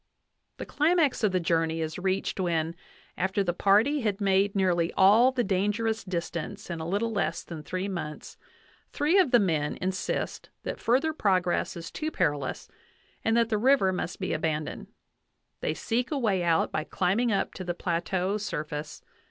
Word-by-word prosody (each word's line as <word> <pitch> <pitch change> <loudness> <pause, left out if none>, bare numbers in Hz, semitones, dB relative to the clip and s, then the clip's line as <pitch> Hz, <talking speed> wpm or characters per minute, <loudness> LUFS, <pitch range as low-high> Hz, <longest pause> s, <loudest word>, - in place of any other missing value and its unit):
The - - -6
climax 305 -4 +2
of 210 - +3
the 185 - +1
journey 165 -1 0
is 160 +1 -3
reached 190 +1 -1
when, 165 -2 0 0.4
after 190 +2 +1
the 175 -2 0
party 215 - +3
had 210 -3 -1
made 195 0 +2
nearly 175 -3 +2
all 215 +7 +6
the 255 -2 0
dangerous 210 +3 0
distance 170 -2 -4
in 170 - -4
a 160 - -4
little 205 +6 0
less 200 -5 -1
than 165 -3 -8
three 185 +5 -3
months, 170 -6 -6 0.6
three 325 +7 +3
of 365 - +4
the 245 - +6
men 160 -8 0
insist 185 +1 -3
that - - -4
further 270 +7 +2
progress 185 - +1
is 165 - -7
too 310 - -3
perilous, 145 - -1 0.6
and 225 +1 +2
that 230 -1 +3
the 215 -3 +1
river 240 -6 +4
must 180 - -4
be 190 - -2
abandoned: 155 -1 -2 0.7
they - - -2
seek 240 +2 -1
a 300 - -1
way 210 -8 +1
out 165 -1 +2
by 155 - -1
climbing 200 +9 0
up 200 - 0
to 185 - -6
the 175 -1 -3
plateau 180 +3 -1
surface. 150 -7 -5
190 Hz, 170 wpm, -28 LUFS, 170-225 Hz, 0.7 s, all